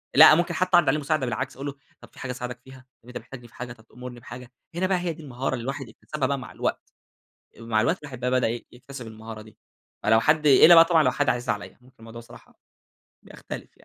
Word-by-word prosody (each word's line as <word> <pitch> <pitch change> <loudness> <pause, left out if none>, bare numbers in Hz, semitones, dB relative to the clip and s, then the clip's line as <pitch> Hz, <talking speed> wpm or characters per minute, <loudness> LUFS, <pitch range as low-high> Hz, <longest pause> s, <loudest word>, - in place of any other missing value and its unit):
لأ، 155 +1 +10
ممكن 175 +1 0
حتى 185 +3 0
أعرض 165 -5 +3
عليه 150 +3 +1
مساعدة 145 -2 -1
بالعكس، 125 +2 -3
أقول 140 +2 -6
له: 140 - -5 0.3
"طب، - - -14
في - - -18
حاجة 125 - -4
أساعدك 125 0 -6
فيها؟ 130 -1 -15 0.2
أنت 125 - -8
محتاجني 120 -3 -11
في - - -25
حاجة؟ 125 -1 -7
طب، 110 -1 -21
تأمرني 125 0 -10
بحاجة؟" 120 +2 -11 0.2
هنا 185 +2 0
بقى 190 -1 +1
هي 175 -2 -2
دي 160 0 -13
المهارة 130 -1 -3
اللي 120 -3 -4
الواحد 135 -1 -5
يكتسبها 135 +4 -4
بقى 140 0 -1
مع 125 - -10
الوقت. - - -4 0.7
مع 115 -1 0
الوقت 165 - +1
الواحد 130 -4 -9
بقى 125 +1 -1
بدأ 130 -2 +2 0.2
يكتسب 125 0 -10
المهارة 110 0 -9
دي. 110 0 -16 0.5
فلو 110 0 +4
حد 150 +3 +2
إلا 160 +5 +8
بقى 165 0 +9
طبعًا 165 -3 +4
لو 125 - +3
حد 145 - 0
عزيز 120 -2 -2
عليّا 105 -1 -3
ممكن 130 +1 -22
الموضوع 115 +1 -11
الصراحة 115 - -16 0.7
بيختلف - - -9
يعني. - - -26
130 Hz, 235 wpm, -25 LUFS, 120-150 Hz, 0.7 s, لأ